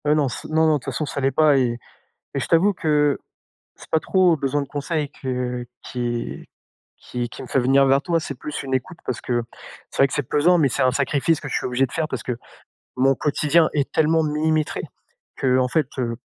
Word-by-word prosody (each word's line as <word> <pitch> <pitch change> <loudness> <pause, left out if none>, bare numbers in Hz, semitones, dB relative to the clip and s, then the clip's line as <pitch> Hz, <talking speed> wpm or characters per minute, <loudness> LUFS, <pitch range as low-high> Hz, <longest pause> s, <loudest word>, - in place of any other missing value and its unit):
Heu, 150 +1 +4
non 145 -3 +2
c - - -7
non 160 +1 +3
non, 155 - +4
de - - -1
toute - - -17
façon 155 - -2
ça 140 - -4
l'est 135 +1 +2
pas 150 0 +4
et 120 -3 +1 0.6
et 140 - 0
je - - -3
t'avoue 180 +5 +4
que 150 -5 +1 0.6
c'est - - -15
pas 160 - +3
trop 185 0 +3
besoin 140 +1 0
de 140 - -5
conseils 145 +1 -2
que 125 -2 -3 0.2
qui 120 -1 -4 0.5
qui 120 -1 -5
qui - - -9
me - - -8
fait 130 - 0
venir 135 +2 +4
vers 135 +1 +3
toi, 170 -1 +1
c'est 145 - -5
plus 150 - -5
une 135 -1 -3
écoute 145 +7 -3
parce 125 - -2
que, 120 -1 0 0.5
c'est - - -11
vrai - - +7
que 135 - -10
c'est 145 - 0
pesant 150 +7 +3
mais 150 -4 +4
c'est 135 - -1
un 130 -1 +3
sacrifice 140 +3 +1
que 145 - -6
je - - -4
suis - - -2
obligé 125 +2 +1
de - - -17
faire 160 -2 -1
parce - - -4
que 125 - -3 0.6
mon 135 +1 +4
quotidien 155 +3 +2
est 145 -2 0
tellement 160 +1 +3
millimétré 155 0 0 0.6
qu'en 130 -1 +3
fait, 155 +2 +1
heu, 115 -2 -1
140 Hz, 230 wpm, -22 LUFS, 130-155 Hz, 0.6 s, vrai